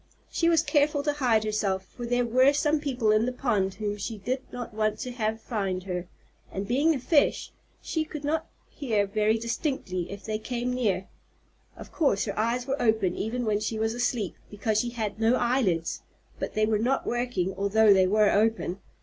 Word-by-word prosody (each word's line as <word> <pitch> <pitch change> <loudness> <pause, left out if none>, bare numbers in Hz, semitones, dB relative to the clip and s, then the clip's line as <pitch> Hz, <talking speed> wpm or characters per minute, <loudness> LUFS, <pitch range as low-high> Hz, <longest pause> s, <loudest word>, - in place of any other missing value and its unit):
She 335 - +2
was 330 -2 +4
careful 290 -2 +2
to 295 0 +1
hide 245 -7 +2
herself, 200 -3 -1
for 240 +4 -8
there 245 0 +1
were 255 +4 +4
some 295 +1 +2
people 255 -7 0
in 215 +2 +3
the - - 0
pond 210 -7 0
whom 210 -1 -3
she 215 +2 -4
did 250 +7 -2
not 245 -2 -6
want 215 0 0
to 250 - -4
have 220 -2 -2
find 195 -5 -2
her; 180 -2 -4 0.4
and, 195 +1 -4
being 290 +7 +3
a - - -3
fish, 290 +3 +2 0.3
she 320 - -1
could 305 -1 -8
not 315 +2 -1 0.2
hear 220 -8 0
very 215 +2 +1
distinctly 230 - -3
if 200 -1 -8
they 215 -1 -2
came 245 +2 -3
near. 200 -7 0 0.7
Of - - -11
course 275 - +1
her - - -4
eyes 235 +3 0
were 275 +2 -2
open 220 -6 +2
even 240 +3 -2
when 210 -1 +1
she 220 +1 -2
was 220 +1 0
asleep, 240 -5 -1 0.2
because 210 +1 0
she 240 - 0
had 220 -3 -4
no 225 +2 +4
eyelids, 235 -11 0 0.4
but - - -4
they 215 0 +3
were 215 -1 +1
not 255 +5 0
working 240 -6 -1
although 200 +2 +4
they 190 -1 +4
were 210 +1 +4
open. 210 -3 +1
225 Hz, 195 wpm, -27 LUFS, 205-250 Hz, 0.7 s, was